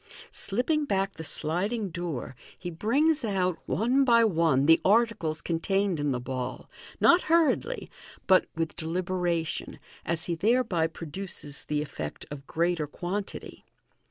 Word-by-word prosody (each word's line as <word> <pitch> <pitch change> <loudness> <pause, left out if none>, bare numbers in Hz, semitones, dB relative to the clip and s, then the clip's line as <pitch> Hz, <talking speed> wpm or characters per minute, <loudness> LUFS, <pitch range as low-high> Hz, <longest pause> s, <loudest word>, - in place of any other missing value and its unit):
Slipping 275 +9 0
back 195 -5 0
the 160 - -8
sliding 195 +8 -2
door, 165 -7 -4 0.2
he 175 -1 -6
brings 280 - +2
out, 185 -5 0
one 250 +6 +2
by 235 -3 +5
one, 165 -9 +3
the 165 +2 +6
articles 205 -8 +2
contained 190 +1 0
in 145 -1 0
the 125 - -1
ball, 130 0 -5 0.3
not 350 +1 +6
hurriedly, 335 - +2 0.3
but 185 -1 +5
with 165 -1 -2
deliberation, 175 0 -2 0.3
as 165 +1 -2
he 175 - -1
thereby 205 -2 +2
produces 165 -2 -5
the 150 0 -1
effect 75 - -6
of 140 -1 -8
greater 170 -2 0
quantity. 190 +7 -5
175 Hz, 130 wpm, -28 LUFS, 160-220 Hz, 0.3 s, the